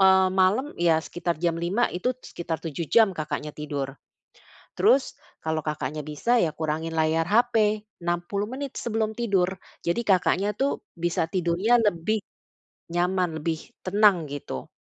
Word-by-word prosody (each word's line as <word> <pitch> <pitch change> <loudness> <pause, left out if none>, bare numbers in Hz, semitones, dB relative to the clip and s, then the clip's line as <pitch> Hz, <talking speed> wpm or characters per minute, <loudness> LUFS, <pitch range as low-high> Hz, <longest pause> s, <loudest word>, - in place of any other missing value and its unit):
eee, 190 0 +6
malem 190 +8 +3
ya, 170 -2 +4
sekitar 175 0 -3
jam 170 +1 +1
05:00, 195 +8 +1
itu 240 +8 -1
sekitar 170 -9 -5
7 160 0 -4
jam 220 -4 +5
Kakaknya 155 -2 -4
tidur. 145 -3 -4 0.8
Terus 275 -10 +4 0.3
kalau 160 0 0
Kakaknya 150 -1 -3
bisa, 235 +11 +1
ya 165 - +2
kurangin 160 +1 -2
layar 160 +1 +2
HP, 215 -1 +3 0.2
60 175 +4 -2
menit 270 +2 -5
sebelum 220 -1 -1
tidur, 200 -6 +1 0.3
jadi 170 +7 +1
Kakaknya 195 +1 +2
tuh 275 +1 0 0.2
bisa 170 -1 0
tidurnya 180 +6 +2
lebih 210 +1 +1 0.7
nyaman, 175 -1 0
lebih 160 +1 -1 0.2
tenang, 195 -4 +4
gitu. 140 - -6
175 Hz, 140 wpm, -26 LUFS, 160-210 Hz, 0.8 s, eee